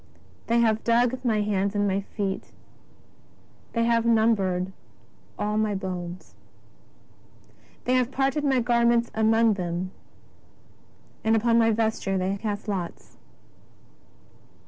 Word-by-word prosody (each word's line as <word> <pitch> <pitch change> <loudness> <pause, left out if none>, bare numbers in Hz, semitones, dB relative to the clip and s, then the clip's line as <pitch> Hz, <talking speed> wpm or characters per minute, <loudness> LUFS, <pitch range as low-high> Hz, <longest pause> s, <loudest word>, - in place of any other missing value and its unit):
X - - -30 0.3
^' - - -30
They 235 +1 +3
have 220 -1 +2
dug 245 +2 +2
my 220 -4 +1
hands 200 -1 0
and 200 -1 0
feet. 195 -2 -4 1.2
They 230 - +1
have 230 -1 +2
numbered 200 -5 +2 0.6
all 210 +1 -1
my 215 -2 0
bones. 180 -2 -6 1.5
They 250 - +1
have 255 -1 +2
parted 270 +2 0
my 265 -3 +2
garments 235 0 +2
among 220 0 +3
them, 180 -1 -3 1.3
and 220 0 +3
upon 230 +1 +3
my 225 0 +4
ves 220 0 0
ture 195 -1 -1
they 190 +1 -1
cast 210 0 -4
lots." 185 -4 -5
220 Hz, 125 wpm, -25 LUFS, 195-235 Hz, 1.5 s, my